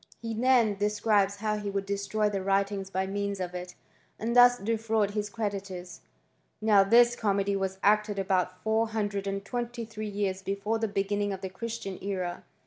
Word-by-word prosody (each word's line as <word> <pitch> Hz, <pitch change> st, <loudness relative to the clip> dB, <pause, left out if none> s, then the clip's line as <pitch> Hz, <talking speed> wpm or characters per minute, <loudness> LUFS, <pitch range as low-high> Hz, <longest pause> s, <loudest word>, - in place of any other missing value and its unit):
He 230 Hz, -1 st, -4 dB
then 230 Hz, -3 st, +3 dB
describes 205 Hz, -1 st, +2 dB
how 210 Hz, +1 st, -1 dB
he 205 Hz, -1 st, -4 dB
would 195 Hz, 0 st, -3 dB
troy 200 Hz, +2 st, 0 dB
the 200 Hz, -2 st, -2 dB
writings 195 Hz, 0 st, 0 dB
by 190 Hz, 0 st, -1 dB
means 200 Hz, 0 st, -3 dB
of 180 Hz, -1 st, -4 dB
it, 180 Hz, 0 st, -7 dB, 0.4 s
and 235 Hz, +2 st, -2 dB
thus 245 Hz, 0 st, +8 dB
defraud 220 Hz, -1 st, 0 dB, 0.2 s
creditors. 195 Hz, -5 st, -5 dB, 0.6 s
Now 210 Hz, -2 st, +5 dB
this 235 Hz, +4 st, +5 dB
comedy 200 Hz, -2 st, 0 dB
was 190 Hz, -1 st, -2 dB
acted 210 Hz, 0 st, +3 dB
about 185 Hz, -2 st, 0 dB
four 220 Hz, +1 st, +2 dB
idred 205 Hz, -2 st, -2 dB
and 195 Hz, 0 st, -3 dB
twenty 240 Hz, -1 st, -4 dB
three 215 Hz, -1 st, -6 dB
years 200 Hz, -2 st, -2 dB
before 200 Hz, +3 st, -2 dB
the 225 Hz, -, 0 dB
beginning 205 Hz, 0 st, -1 dB
the 190 Hz, -1 st, -5 dB
Christian 210 Hz, -1 st, -5 dB
era. 185 Hz, -3 st, -3 dB
205 Hz, 165 wpm, -28 LUFS, 195-220 Hz, 0.6 s, thus